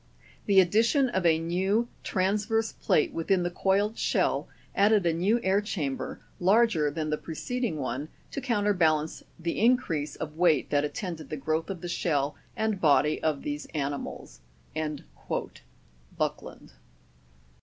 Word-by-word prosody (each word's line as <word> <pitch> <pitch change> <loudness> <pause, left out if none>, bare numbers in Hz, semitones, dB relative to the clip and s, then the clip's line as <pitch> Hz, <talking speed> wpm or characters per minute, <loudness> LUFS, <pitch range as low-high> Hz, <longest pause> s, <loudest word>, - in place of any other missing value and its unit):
The 200 -2 +6
addition 225 - +3
of 190 -6 +1
a 160 -1 +4
new 190 +8 0 0.2
transverse 210 +4 0
plate 150 - +1
within 180 +2 +1
the 175 - -1
coiled 200 +4 +1
shell - - +1 0.3
added 205 -1 +4
a 170 - +3
new 195 +8 +2
air 190 +2 +3
chamber, 150 -10 -3 0.2
larger 190 -5 +4
than 155 +1 -3
the 150 - -1
preceding 230 +3 -3
one, 140 +2 -3 0.2
to 275 - -4
counterbalance 190 - +1 0.2
the 170 0 -3
increase 175 - +2
of 155 0 -6
weight 165 -5 +3
that 145 -1 +3
attended 165 +1 -5
the 155 - -4
growth 155 +5 -1
of 185 -4 -5
the 175 - -5
shell 150 -4 0 0.2
and 220 -3 -1
body 150 0 +3
of 155 -3 0
these 145 +1 -4
ani 145 -1 -1
mals." - - -9 1.8
Buckland. - - -4
175 Hz, 140 wpm, -28 LUFS, 155-205 Hz, 1.8 s, The